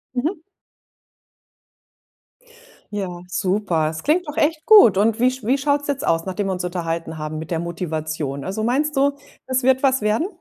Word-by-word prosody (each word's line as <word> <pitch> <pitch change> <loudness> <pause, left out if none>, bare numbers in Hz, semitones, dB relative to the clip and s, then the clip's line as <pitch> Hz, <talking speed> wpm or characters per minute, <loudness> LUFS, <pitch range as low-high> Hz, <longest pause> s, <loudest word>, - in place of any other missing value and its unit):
Mhm. 305 +8 -1 2.5
Ja, 185 -4 -4
super. 180 -3 0
Es 160 0 -7
klingt 335 +4 +1
doch 295 - -7
echt 310 +1 +1
gut 405 - +7
und 220 +3 +2
wie 250 +1 +4
sch 260 -1 -9
wie 255 +6 +2
schaut's 285 +1 0
jetzt 280 -1 -2
aus, 165 0 +1
nachdem 195 +1 -2
wir - - -1
uns 180 -1 -4
unterhalten 165 -2 -4
haben 155 0 -5
mit 160 - -8
der 165 - 0
Motivation? 155 -4 -4
Also 195 +3 -3
meinst 290 +6 0
du, 280 +1 +3 0.3
es 260 0 0
wird 260 +1 +3
was 265 -2 +2
werden? 215 - +1
210 Hz, 175 wpm, -21 LUFS, 170-270 Hz, 2.5 s, gut